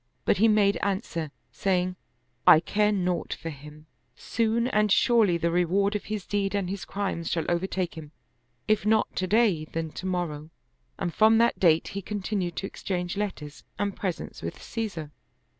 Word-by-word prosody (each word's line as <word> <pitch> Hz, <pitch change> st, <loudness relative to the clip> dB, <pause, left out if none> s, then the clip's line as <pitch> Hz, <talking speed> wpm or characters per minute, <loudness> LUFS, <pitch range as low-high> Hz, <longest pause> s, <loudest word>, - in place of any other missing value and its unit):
But -, -, +3 dB
he 220 Hz, +4 st, +5 dB
made 210 Hz, -2 st, +4 dB
answer, 190 Hz, -6 st, -2 dB, 0.2 s
saying, 185 Hz, -1 st, 0 dB, 0.3 s
" 120 Hz, 0 st, -43 dB
I 155 Hz, -, +10 dB
care 210 Hz, +5 st, +1 dB
naught 180 Hz, -3 st, -1 dB
for 165 Hz, -, -6 dB
him: 150 Hz, +1 st, -12 dB, 0.3 s
soon 230 Hz, +1 st, 0 dB
and 210 Hz, -4 st, +2 dB
surely 215 Hz, -6 st, +4 dB
the 170 Hz, 0 st, 0 dB
reward 190 Hz, +4 st, +2 dB
of 210 Hz, -, -3 dB
his 210 Hz, -2 st, -4 dB
deed 200 Hz, -1 st, -1 dB
and 190 Hz, -2 st, -1 dB
his 195 Hz, -1 st, -5 dB
crimes 195 Hz, -5 st, -3 dB
shall 165 Hz, -1 st, -1 dB
overtake 180 Hz, 0 st, -1 dB
him, 155 Hz, -2 st, -9 dB, 0.6 s
if 215 Hz, -2 st, +2 dB
not 215 Hz, +1 st, +2 dB
to 185 Hz, -, 0 dB
day, 205 Hz, -7 st, +3 dB
then 160 Hz, 0 st, -4 dB
to 185 Hz, -, -6 dB
morrow." 160 Hz, -4 st, -3 dB, 0.5 s
And 170 Hz, -, -3 dB
from 220 Hz, +1 st, +5 dB
that 235 Hz, +1 st, +3 dB
date 165 Hz, -3 st, +4 dB
he 200 Hz, -, -5 dB
continued 195 Hz, -3 st, -3 dB
to -, -, -3 dB
exchange 180 Hz, -1 st, -3 dB
letters 185 Hz, -8 st, -5 dB
and 200 Hz, -1 st, -1 dB
presents 185 Hz, -5 st, -4 dB
with 85 Hz, -, -6 dB
Caesar. 195 Hz, -10 st, -4 dB
190 Hz, 175 wpm, -27 LUFS, 165-210 Hz, 0.6 s, I